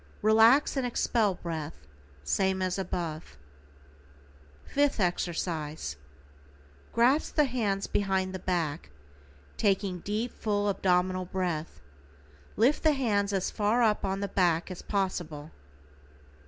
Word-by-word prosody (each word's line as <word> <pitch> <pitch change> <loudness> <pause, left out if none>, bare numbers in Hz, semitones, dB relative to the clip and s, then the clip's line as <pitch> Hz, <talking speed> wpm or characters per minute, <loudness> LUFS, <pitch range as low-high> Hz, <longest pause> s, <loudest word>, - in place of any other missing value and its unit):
Relax 225 +8 +5
and 270 - 0
expel 230 -4 +1
breath 155 - -6 0.4
same 190 - +1
as 185 0 -1
above. 165 - -4 1.3
=FIFTH 285 -3 +1
EXERCISE:= 165 - -2 1.0
Grasp 250 +6 +2
the 300 - +4
hands 215 -7 -1
behind 190 -2 0
the 190 - -4
back, 165 - -2 0.7
taking 195 -3 +1
deep, 215 +6 -3
full 205 -1 -1
abdominal 185 -1 +1
breath, 175 -4 -3 0.8
lift 250 +7 +3
the 310 -2 +4
hands 205 -7 0
as 195 -2 -1
far 220 +4 +1
up 215 -2 +2
on 195 0 -1
the 200 - -1
back 175 -2 +1
as 180 - -7
possible. 170 -6 -3
190 Hz, 115 wpm, -29 LUFS, 175-215 Hz, 1.3 s, Relax